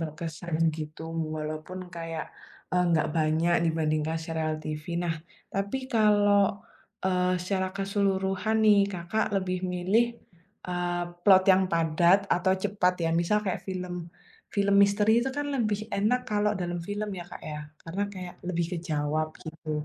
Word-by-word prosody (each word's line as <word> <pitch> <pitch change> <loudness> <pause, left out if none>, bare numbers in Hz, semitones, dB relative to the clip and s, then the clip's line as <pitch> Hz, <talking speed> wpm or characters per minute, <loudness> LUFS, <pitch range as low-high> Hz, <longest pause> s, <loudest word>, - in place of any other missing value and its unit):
berkesan 160 +1 -5 0.2
gitu 155 0 -7 0.3
walaupun 155 +3 -5 0.2
kayak, 165 -1 -4 0.5
eee, 180 0 +3
nggak 160 -2 +2
banyak 160 +2 +2
dibandingkan 160 0 0
serial 160 -1 -1
TV 155 0 -5 0.2
nah, 170 -2 0 0.4
tapi 200 +6 -1 0.2
kalau, 205 -2 +4 0.4
eee, 180 -1 +2
secara 190 0 -1
keseluruhan 195 +1 0
nih 210 -1 +7
Kakak 180 +5 -1
lebih 185 -1 -1
milih, 185 +6 +3 0.6
eee, 175 0 -1 0.2
plot 190 -1 +7
yang 190 +1 +4
padat 170 +3 +4
atau 185 +2 +3
cepat 200 -3 +2
ya? 165 - +2
Misal 190 +5 +2
kayak 190 - -1
film, 180 -1 -4 0.6
film 200 -1 +3
misteri 205 +2 +4
itu 265 +3 -1
kan 290 0 -2
lebih 215 -7 0
enak 215 +5 +2
kalau 210 0 +2
dalam 175 -1 -3
film 205 +1 -3
ya 175 -2 -6
Kak - - -10
ya 150 -1 -5 0.2
karena 180 +5 -3
kayak 180 -2 -7
lebih 170 -1 0
kejawab 155 -1 -1 0.2
gitu, 155 -1 -4
180 Hz, 140 wpm, -28 LUFS, 165-200 Hz, 0.6 s, nih